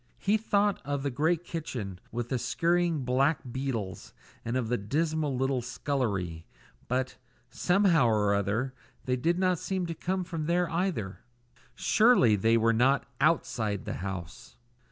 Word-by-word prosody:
He 205 +2 +1
thought 205 -2 +1
of 140 -1 -2
the 140 - -1
great 160 +6 +1
kitchen, 120 - -5
with 120 +1 -3
the 130 - 0
scurrying 170 -1 +1
black 135 +5 +2
beetles, 120 -7 -4 0.3
and 115 +2 -1
of 125 -3 -1
the 125 +2 0
dismal 150 +5 -1
little 135 0 0
scullery; 105 - -2 0.4
but, 125 +1 -1 0.3
somehow 180 -7 +3
or 105 -2 +2
other, 110 +6 0 0.3
they 125 - +1
did 165 +8 +1
not 185 -2 +2
seem 190 -2 -2
to 170 - -3
come 185 +3 -2
from 165 -3 -4
there 175 +1 +2
either. 165 - -2 0.6
Surely 215 - +4
they 115 +3 +3
were 115 0 +3
not 130 +4 +3 0.2
outside 115 - +1
the - - -3
house! 95 +4 -7
135 Hz, 150 wpm, -29 LUFS, 115-170 Hz, 0.6 s, Surely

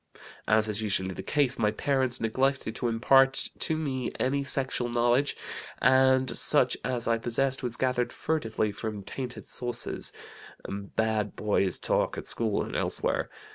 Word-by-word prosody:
"As 110 0 +4
is 105 0 -2
usually 95 -3 -1
the 95 - -6
case, 135 +5 0
my 105 - +3
parents 130 +2 0
neglected 130 +1 0
to 120 - -1
impart 135 +4 +3
to 160 - 0
me 130 -5 -2
any 140 +2 +1
sexual 130 -2 +2
knowledge, 120 +4 +2 0.4
and 130 0 +4
such - - +3
as 125 -1 -2
I 115 -1 +2
possessed 130 +3 0
was 120 -2 -3
gathered 125 -2 0
furtively 115 -9 -1
from 105 -1 -5
tainted 125 +4 -6
sources, 120 -1 -3 0.6
bad 105 +1 -2
boys' 100 -3 +1
talk - - 0
at - - -6
school 110 -3 0
and - - -6
elsewhere. - - 0
120 Hz, 145 wpm, -28 LUFS, 110-130 Hz, 0.6 s, As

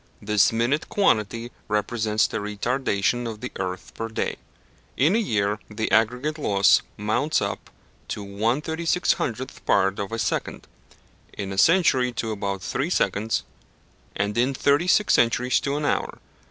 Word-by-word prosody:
This 105 -1 +3
minute 120 +7 0
quantity 115 - +1 0.2
represents 105 0 +1
the - - -3
retardation 115 +2 -1
of 110 -2 -7
the 125 - -6
earth 95 -1 -5
per 115 - -4
day. 110 - -3 0.6
In 155 +9 +3
a - - +3
year 105 - 0
the 110 +1 -3
aggregate 125 +8 +1
loss 100 -7 +4 0.2
mounts 110 +9 0
up 100 0 -4 0.4
to 105 - -5
1/3600th 130 - -1
part 95 +1 +2
of 100 0 -4
a 115 - -2
second, - - -2 0.7
in 100 -1 -5
a - - -7
century 145 - +4
to 115 -1 -3
about 100 -2 -3
three 140 +5 -2
seconds, 105 - 0 0.7
and 100 +1 -1
in 130 +3 +1
thirty 145 +6 +2
six 210 +3 +4
centuries 125 +2 +3
to 140 0 -2
an 150 - -2
hour. - - -1
115 Hz, 145 wpm, -24 LUFS, 105-135 Hz, 0.7 s, loss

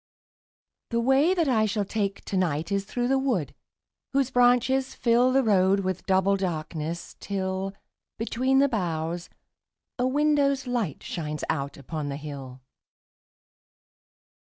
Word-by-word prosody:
The 235 - 0
way 270 +9 +3
that 335 -4 +1
I 220 -4 +3
shall 205 0 -1
take 200 -1 -2
to - - -4
night 165 -2 0
Is 200 0 0
through 245 +3 -2
the 270 +1 +2
wood 245 - -1 0.6
whose 270 -1 +1
branches 250 +2 +3
fill 245 +2 +3
The 270 +1 +3
road 195 -2 +3
with 185 0 -3
double 190 +1 +3
darkness, 165 -2 -4
till, 190 -1 -3 0.4
Between 255 +4 +1
the 280 +1 +5
boughs, 170 - -2 0.7
a 250 - +2
window's 280 -1 +2
light 240 - -2
Shines 150 -3 -4
out 140 0 -3
upon 145 +1 -5
the 140 - -4
hill. 135 -3 -8
200 Hz, 130 wpm, -26 LUFS, 170-255 Hz, 0.7 s, the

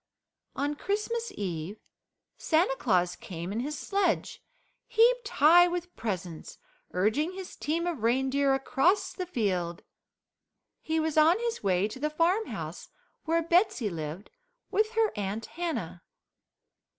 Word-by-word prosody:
On 290 +1 -1
Christmas 425 +7 -2
Eve 180 +1 -4 0.6
Santa 320 -3 +2
Claus 180 -8 +1
came 170 0 -7
in 215 - -2
his 295 +5 -3
sledge 390 -4 -1 0.4
heaped 475 0 +3
high 345 0 +6
with 355 0 -4
presents, 185 -7 -5 0.3
urging 220 - +1
his 375 -1 -8
team 330 +3 -1
of 335 -9 -3
reindeer 265 +4 +2
across 270 +8 +1
the 365 -2 -5
field. 185 - -1 1.0
He 320 0 -1
was 315 -1 +1
on 325 +4 +6
his 470 0 -3
way 190 0 +2
to 220 +4 -9
the 300 +2 0
farmhouse 345 +8 -1 0.4
where 330 +1 +1
Betsey 335 - +2
lived 160 +3 -6 0.4
with 435 +2 +1
her 450 -2 +2
Aunt 205 +2 -3
Hannah. 340 -1 -4
300 Hz, 125 wpm, -29 LUFS, -, 1.0 s, high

